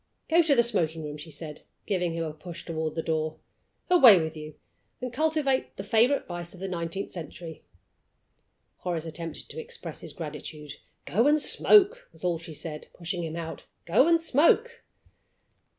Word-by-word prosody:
"Go 335 +1 +6
to 310 -4 +3
the 235 - +5
smoking 165 -9 0
room," 150 0 -6
she 150 +2 -10
said, 155 -1 -6 0.2
giving 180 -4 0
him 165 0 -2
a 155 -2 -4
push 170 +2 -9
toward 160 -2 -3
the 160 - -2
door. 155 -1 -1 0.5
"Away 255 - +8
with 160 0 -3
you, 155 -1 -9 0.4
and 250 -1 -5
cultivate 305 -2 0
the 195 - -5
favorite 230 +7 +3
vice 175 0 -5
of - - -13
the 195 - -4
nineteenth 175 +1 -3
century." 165 -1 -7 1.1
Horace 170 -3 -3
attempted 165 0 -6
to - - -7
express 475 0 -8
his - - -8
gratitude. 150 -2 -7 0.3
"Go 230 +8 +2
and 300 +1 +4
smoke!" 430 +10 +5
was - - -15
all 175 -2 0
she 165 -2 -10
said, 150 0 -6
pushing 175 0 -3
him 160 -1 -4
out. 165 -1 -6 0.2
"Go 210 - +4
and 335 -1 +5
smoke!" 335 - +3
175 Hz, 170 wpm, -27 LUFS, 160-270 Hz, 1.1 s, Away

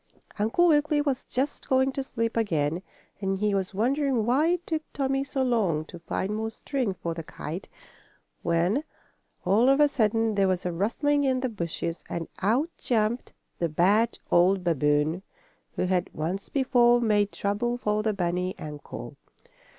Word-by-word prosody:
Uncle 225 +12 +3
Wiggily 300 -1 +3
was 280 -3 -1
just 270 +3 -3
going 265 0 +3
to 275 - -3
sleep 230 -3 -2
again, 165 -7 0 0.4
and 195 -1 -1
he 210 +1 +1
was 195 0 -1
wondering 250 +3 +1
why 265 +7 +3
it 350 0 0
took 315 -2 -1
Tommie 270 -1 0
so 275 -1 -2
long 200 -11 +1
to 175 - -11
find 190 +4 -2
more 220 +1 -2
string 235 -3 -2
for 170 -2 -4
the 165 - -5
kite, 160 +2 -7 0.7
when, 175 - +1 0.6
all 225 +7 +4
of 275 +1 +4
a 295 - +7
sudden, 225 -4 +1
there 200 -1 +3
was 185 -1 -1
a 180 - 0
rustling 285 - +1
in 260 -2 +1
the 255 - 0
bushes, 170 -4 -4
and 165 -1 -3
out 245 - +1
jumped 230 0 0 0.3
the 170 - 0
bad 200 +9 +3
old 180 +2 +4
babboon, 150 +1 +1 0.5
who - - 0
had, 180 -1 0
once 175 +6 -3
before, 245 -3 +4
made 210 -3 +2
trouble 215 +5 -1
for 210 -3 0
the 215 0 +1
bunny 180 -1 -1
uncle. 150 -1 -8
215 Hz, 165 wpm, -27 LUFS, 180-260 Hz, 0.7 s, a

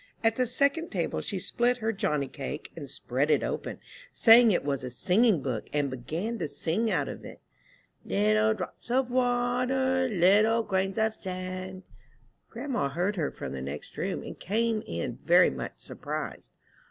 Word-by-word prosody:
At 225 0 +3
the 255 0 +1
second 280 +7 +1
table 175 -5 -2
she 200 - -3
split 240 +6 +1
her 225 -1 -1
johnny 150 -10 0
cake, 140 +2 -6
and 145 -5 -8
spread 135 +1 -1
it - - +3
open, - - -3 0.3
saying 235 0 +7
it 185 - +1
was 140 -3 -1
a 125 - -4
singing 180 - +2
book, 120 -5 -3
and 145 -2 0
began 165 - -4
to - - -1
sing 200 +10 -1
out 195 - 0
of - - -7
it, - - -10 0.6
"Little 105 +3 +2
drops - - -8
of 255 0 +1
water, 255 +1 +1
Little 210 +4 +4
grains 195 -1 -1
of 220 0 +2
sand." 185 -1 -6 0.7
Grandma 250 - -2
heard 175 +8 -1
her 160 -6 -1
from - - -7
the 65 - -5
next 70 +3 -7
room, - - -3
and - - -9
came 225 +3 0
in 85 0 -4
very - - +6
much 65 -2 -5
surprised. - - -6
190 Hz, 165 wpm, -28 LUFS, 145-235 Hz, 0.7 s, saying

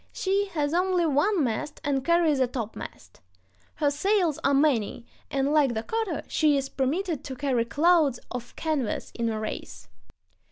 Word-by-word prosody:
She 395 +1 0
has 295 -1 0
only 360 0 +2
one 325 +4 +2
mast 240 +4 -3
and 275 -2 0
carries 330 -2 +3
a 260 - +3
topmast. 225 - -7 0.5
Her 290 -2 +1
sails 350 0 +1
are 275 - +3
many, 255 -6 +1 0.2
and, 275 +1 0
like 280 -6 +3
the 220 - -2
cutter, 445 - -2
she 300 -3 +3
is 270 0 -2
permitted 305 +4 -1
to 265 - -6
carry 255 -3 0
clouds 300 -1 +3
of 245 -1 -6
canvas 300 -8 -2
in 230 -1 -1
a 220 -1 -2
race. 95 - -6
285 Hz, 160 wpm, -26 LUFS, 250-335 Hz, 0.5 s, carries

